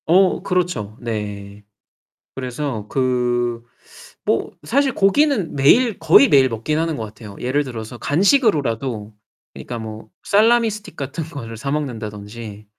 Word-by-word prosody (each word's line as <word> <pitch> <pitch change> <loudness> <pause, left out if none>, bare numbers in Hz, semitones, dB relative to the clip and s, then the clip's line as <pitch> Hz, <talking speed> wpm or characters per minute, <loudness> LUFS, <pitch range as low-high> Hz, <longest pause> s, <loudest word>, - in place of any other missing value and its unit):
어 185 +3 +4
그렇죠. 170 - -1
네. 105 -3 -5 0.7
그래서 130 -4 -4
그 120 -2 0 0.6
뭐 - - 0
사실 270 - +1
고기는 210 - +2
매일 215 - +4
거의 160 -3 +6
매일 135 -3 +6
먹기는 125 +8 -1
하는 165 -1 -1
것 115 - -4
같아요. 105 -1 -11
예를 140 +4 0
들어서 120 -2 -7
간식으로라도 140 - +1 0.4
그러니까 120 -1 -7
뭐 110 -1 -8 0.2
salami 230 +3 +4
stick 210 -6 -6
같은 140 +3 -4
거를 115 -8 -8
사 140 +4 -4
먹는다든지 110 -6 -5
130 Hz, 315 characters per minute, -20 LUFS, 110-165 Hz, 0.7 s, 거의